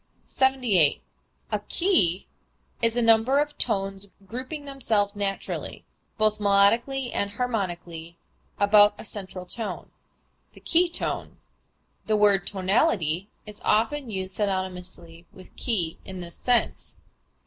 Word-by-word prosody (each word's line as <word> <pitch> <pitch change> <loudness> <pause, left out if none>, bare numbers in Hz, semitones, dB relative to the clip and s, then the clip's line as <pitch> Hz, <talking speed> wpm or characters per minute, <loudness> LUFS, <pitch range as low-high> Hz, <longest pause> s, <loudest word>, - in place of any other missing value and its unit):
78. 250 - +2 0.5
A - - 0
key 255 - +1 0.6
is 230 0 +3
a 240 - +2
number 230 +4 +4
of 295 0 0
tones 195 0 0 0.2
grouping 255 - -6
themselves 220 -7 -1
naturally 200 -1 -4 0.3
(both 215 -1 +1
melodically 230 +6 +3
and 200 - 0
harmonically) 175 -7 -4 0.4
about 205 0 +6
a - - -9
central 190 -3 -6
tone 220 +3 -5 0.6
the - - -15
key 345 +1 +2
tone. - - -2 0.7
The 215 -1 +2
word 200 -3 +4
tonality 190 - +1 0.2
is 210 -1 -11
often 245 +5 +1
used 190 -2 -5
synonymously 180 -4 -4
with 185 - -16
key 180 -10 -2
in 190 -1 -8
this 170 -1 -8
sense. 245 -1 0
205 Hz, 115 wpm, -25 LUFS, 185-240 Hz, 0.7 s, about